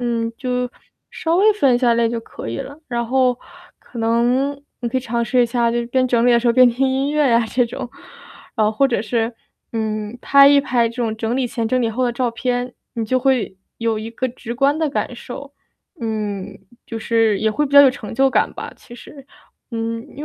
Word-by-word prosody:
嗯， 230 -1 -1
就 250 -1 -2 0.4
稍 330 +1 -1
微 420 +3 +5
分 275 -11 +3
一 - - +2
下 240 -2 +3
类 230 0 +2
就 230 -1 -3
可 170 - -9
以 115 - -4
了。 285 +3 -7
然 235 -1 -2
后 255 0 +2 0.4
可 235 - -12
能 245 +5 +1 0.2
你 240 - -2
可 260 +2 0
以 - - -6
尝 235 -1 -2
试 245 +2 +2
一 - - +2
下 235 0 +1
就 235 0 -1
边 255 +1 +2
整 240 0 +2
理 245 - +5
的 235 - +5
时 245 - -2
候 - - +4
边 255 0 +6
听 255 +3 0
音 270 +2 0
乐 300 -3 +3
呀 230 0 +4
这 245 +2 +1
种。 250 +1 -6 0.7
哦， 215 -1 +2
或 270 +5 +2
者 235 - 0
是， 230 +1 -1 0.4
嗯， 215 0 -3
拍 280 0 +6
一 285 0 +6
拍 240 -4 +1
这 235 - -11
种 225 -3 -2
整 225 +2 -2
理 260 -2 0
前 230 -1 -3
整 255 +1 +1
理 230 - +1
后 255 +3 -1
的 240 - +1
照 245 +1 0
片， 245 +1 -2 0.2
你 230 -1 -2
就 255 +4 0
会 250 -7 0 0.2
有 225 -1 0
一 225 +1 -6
个 255 +3 -2
直 235 -1 -7
观 280 +3 +2
的 315 -3 0
感 250 - -2
受。 280 +4 -9 0.5
嗯， 210 -4 -4 0.3
就 225 - -5
是 225 -2 +2
也 220 - +2
会 295 +7 0
比 275 - -11
较 285 - +10
有 270 - +7
成 245 -5 -8
就 270 +3 +4
感 - - +1
吧， - - -7
其 240 - -14
实。 275 +2 -13 0.5
嗯， 230 +1 -3
因 295 - -6
240 Hz, 245 characters per minute, -20 LUFS, 230-260 Hz, 0.7 s, 较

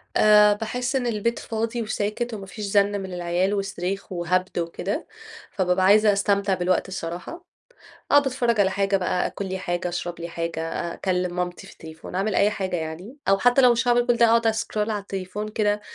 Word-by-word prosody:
آآ 210 -1 +6
باحس 245 +5 -3
إن 250 -2 0
البيت 235 +1 -1
فاضي 230 +1 -3
وساكت 220 +2 -2
وما 200 -3 -6
فيش 205 +2 -7
زن 200 0 +2
من 190 -1 -7
العيال 175 +2 0
وصريخ 195 -1 -3
وهبد 185 +1 -1
وكده، 170 +4 -3 0.4
فبابقى 185 -1 +1
عايزة 210 +2 +6
أستمتع 200 0 +1
بالوقت 185 +1 0
الصراحة، 180 - -6 0.7
أقعد 285 -1 +5
أتفرّج 240 -4 +1
على 190 -1 +3
حاجة 195 0 +1
بقى، 180 -1 0
أكل 200 - -5
لي 190 - -3
حاجة، 175 0 -2
أشرب 175 0 -5
لي 170 - -5
حاجة، 165 -1 -4 0.2
أكلم 180 -1 -1
مامتي 180 0 -3
في - - -13
التليفون، 160 +1 -11
أعمل 195 +2 0
أي 205 +2 +4
حاجة 190 -3 -2
يعني، 165 - -6
أو 195 - +4
حتّى 245 +4 +4
لو 250 - +7
مش 235 +1 0
هاعمل 240 0 +3
كل 240 - +3
ده 235 - +5
أقعد 230 0 +3
أسكرول 220 -1 -1
على 210 -1 -1
التليفون 195 +2 -5
كده 210 -1 0
200 Hz, 190 wpm, -24 LUFS, 180-220 Hz, 0.7 s, لو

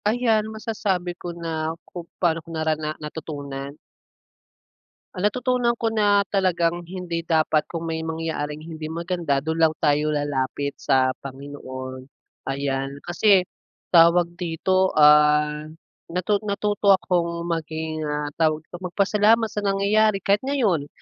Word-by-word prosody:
Ayan, 220 -1 +2
masasabi 210 -5 -2
ko 175 0 -8
na 165 -1 -3
kung 170 -2 -9
paano 165 -2 +1
ko 165 - -17
narana 155 -1 -2
natutunan? 145 -2 -7 1.4
Ang 185 +3 +1
natutunan 250 +1 0
ko 230 -1 -1
na 205 -2 +3
talagang 175 -3 +1
hindi 180 -2 -4
dapat, 155 -2 +1
kung 165 -1 -5
may 165 -1 -3
mangyaring 160 -2 -4
hindi 160 -1 -7
maganda, 165 -4 -1
dun 160 +1 -2
lang 160 -1 +4
tayo 150 0 +3
lalapit 140 -2 -2
sa 130 -1 +3
Panginoon, 130 -1 -8 0.4
ayan. 135 0 -2
Kasi, 190 +2 +4 0.5
tawag 170 0 +5
dito, 185 +2 +1
ah, 150 0 +5 0.4
natu 180 +4 0
natuto 200 -1 +3
akong 170 -2 -1
maging, 160 -2 -3
ah, 150 0 -2
tawag 155 -1 +2
dito, 175 - -11
magpasalamat 210 +4 +2
sa - - -3
nangyayari. 200 0 +2
Kahit 200 +1 +3
ngayon 205 - +1
165 Hz, 125 wpm, -23 LUFS, 150-195 Hz, 1.4 s, tawag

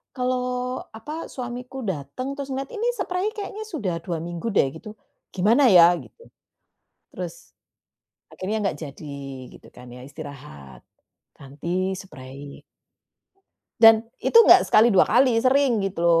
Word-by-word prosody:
kalau 250 0 -2 0.2
apa, 300 +9 -7
suamiku 250 +1 -7
datang 190 - -5
terus 275 - -4
ngelihat, 270 +1 -5
ini 455 +2 -2
sprei 365 0 -2
kayaknya 425 +1 -6
sudah 200 - -3
2 165 -1 -5
minggu 175 +4 -6
deh 170 -11 +2
gitu, 215 +4 -11 0.4
gimana 230 +9 +4
ya?" 175 -4 +7
gitu. 470 - -16 0.9
Terus, - - -8 0.8
akhirnya 210 +3 -4
nggak 185 -7 -2
jadi 150 0 -9 0.5
gitu - - -18
kan 125 0 -13
ya 125 +2 -11
istirahat, 140 - -11 0.5
ganti 170 +8 -3
sprei. 140 -6 -11 1.2
Dan 225 0 +7 0.2
itu 465 - +5
enggak - - +8
sekali, 215 +2 +5
2 185 - +6
kali, 250 -1 +3
sering 260 -4 +2
gitu 195 -2 -4
loh. 165 -1 +5
210 Hz, 135 wpm, -23 LUFS, 165-255 Hz, 1.2 s, enggak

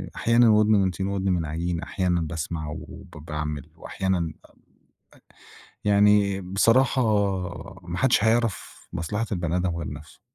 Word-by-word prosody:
أحيانًا 115 0 +4
وودن 105 0 +4
من 95 -3 +3
طين 95 +2 -3
ودن 95 -1 -1
من 85 -3 0
عجين، 85 +2 -2
أحيانًا 90 -3 -1
باسمع 80 0 -4
وب 95 +4 -9 0.2
باعمل 75 -2 -5
وأحيانًا 95 -1 -2
أ 80 -2 -6
أ - - -23 1.3
يعني 100 -1 +4
بصراحة 115 +8 +3 0.9
ما 90 - -3
حدّش 125 -5 +3
هيعرف 115 -2 0
مصلحة 105 +6 -2
البني 85 -2 -1
آدم 90 -2 -1
غير 80 - -5
نفْسه. 75 +1 -13
95 Hz, 140 wpm, -25 LUFS, 85-105 Hz, 1.3 s, أحيانًا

